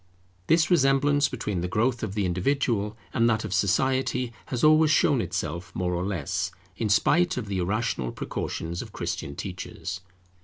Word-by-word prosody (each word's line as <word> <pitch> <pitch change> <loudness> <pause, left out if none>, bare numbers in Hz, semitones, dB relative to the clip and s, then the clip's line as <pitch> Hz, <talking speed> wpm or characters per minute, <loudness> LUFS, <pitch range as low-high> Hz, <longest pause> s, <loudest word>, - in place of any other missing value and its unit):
This 165 +2 +3
resemblance 145 -2 +4
between 105 -7 -3
the 90 - -1
growth 120 +5 0
of 100 -2 -4
the 105 -2 +1
individual 105 +3 0 0.2
and 115 -1 +3
that 110 -1 0
of 100 - -4
society 125 +4 +1
has 125 -2 -3
always 155 0 +6
shown 145 -4 +4
itself 85 -1 -4
more 90 -1 -1
or 85 +1 -1
less, 95 -1 -2 0.3
in 110 +1 -2
spite 165 - +3
of 125 - -2
the 100 -2 -2
irrational 95 - -1
precautions 85 +2 -4
of - - -10
Christian 70 - -4
teachers. 95 +1 -6
110 Hz, 160 wpm, -26 LUFS, 90-130 Hz, 0.3 s, always